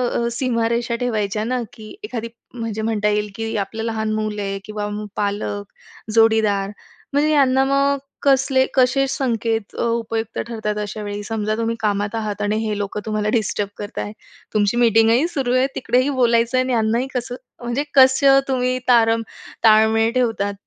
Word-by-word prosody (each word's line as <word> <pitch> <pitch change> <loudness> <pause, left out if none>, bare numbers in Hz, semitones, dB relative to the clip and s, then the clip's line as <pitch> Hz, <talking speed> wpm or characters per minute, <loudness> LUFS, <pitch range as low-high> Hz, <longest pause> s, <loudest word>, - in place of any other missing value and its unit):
अ, 235 - 0
सीमारेषा 235 -1 0
ठेवायच्या 215 -4 -1
ना. 250 +2 -1
की 215 +5 -11
एखादी, 235 - -4 0.5
जे 220 - -4
म्हणता 215 -1 0
येईल 210 0 0
की 225 +1 -4
आपलं 215 +3 -3
लहान 220 -1 -2
मुल 215 -1 -2
आहे 195 -1 -3
किंवा 210 -1 -4
मग 210 0 -5
पालक, 205 0 -3 0.4
जोडीदार 220 -3 +3 0.4
म्हणजे 290 +2 +2
यांना 265 -3 +4
मग 275 +1 +2 0.3
कसले 270 -1 +3
कसे 265 +1 +3
संकेत 230 -5 -1
अ, - - -2
उपयुक्त 230 -1 -2
ठरतात 220 -2 -3
अशा 210 +1 -5
वेळी. 205 0 -4
समजा 215 0 -2
तुम्ही 230 0 -1
कामात 205 0 -1
आहात 210 -2 -3
आणि 205 +1 0
हे 210 -1 -2
लोकं 205 0 -3
तुम्हाला 215 -1 -1
डिस्टर्ब 205 -2 -2
करताय. 205 0 -5 0.4
तुमची 210 +1 +1
मीटिंगही 230 +4 +4
सुरू 270 -7 -1
आहे. 255 +1 +3
तिकडेही 255 +2 +1
बोलायचं 235 -2 +2
आहे 255 - +3
आणि 255 0 -1
यांनाही 230 +2 +1
कसं 245 0 -3 0.3
म्हणजे 240 +4 -1
कसं 270 +1 +6
तुम्ही 255 -1 0
तारम 230 -2 +4 0.4
ताळमेळ 220 +1 +5
ठेवतात? 225 -5 0
225 Hz, 160 wpm, -20 LUFS, 210-250 Hz, 0.5 s, कसं